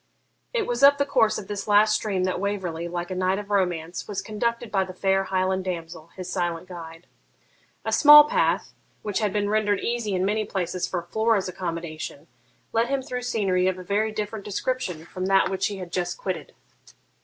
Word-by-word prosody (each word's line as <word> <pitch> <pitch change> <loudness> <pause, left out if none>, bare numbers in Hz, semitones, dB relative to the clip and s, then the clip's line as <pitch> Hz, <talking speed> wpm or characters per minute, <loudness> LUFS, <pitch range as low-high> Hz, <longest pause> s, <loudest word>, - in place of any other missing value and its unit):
It 470 -4 0
was 240 +1 -2
up 280 0 +7
the 280 - +1
course 225 -6 +2
of 205 - -7
this 205 -1 -5
last 210 +1 +5
stream 205 -3 0
that 185 -1 -1
Waverley, 185 -4 -3
like 175 +1 -4
a - - -2
knight 185 +1 +1
of 205 0 -7
romance, 175 -4 -1
was 205 -2 -4
conducted 235 +2 -2
by 195 -2 +2
the 185 -1 -9
fair 195 0 +1
Highland 190 0 0
damsel, 165 -3 -5
his 185 -1 -7
silent 175 -2 -2
guide. 165 -1 -10 0.8
A - - -1
small 295 0 +10
path, - - +1 0.3
which 210 -2 -1
had 210 -3 0
been 205 0 0
rendered 205 -1 +1
easy 235 -4 -1
in 185 +1 +1
many 215 +2 +1
places 180 -3 -2
for 175 -2 -3
Flora's 220 +2 +1
accommodation, 165 -4 -5 0.5
led 230 +1 +2
him 275 0 -1
through 250 -1 -4
scenery 195 -7 +1
of 185 -1 0
a 185 - -8
very 210 +4 0
different 215 0 -4
description 195 -6 -3
from 185 +2 -4
that 195 0 +4
which 190 0 0
he 205 - -5
had 180 -2 -8
just 175 -1 -2
quitted. 175 -6 -5
195 Hz, 195 wpm, -25 LUFS, 180-215 Hz, 0.8 s, small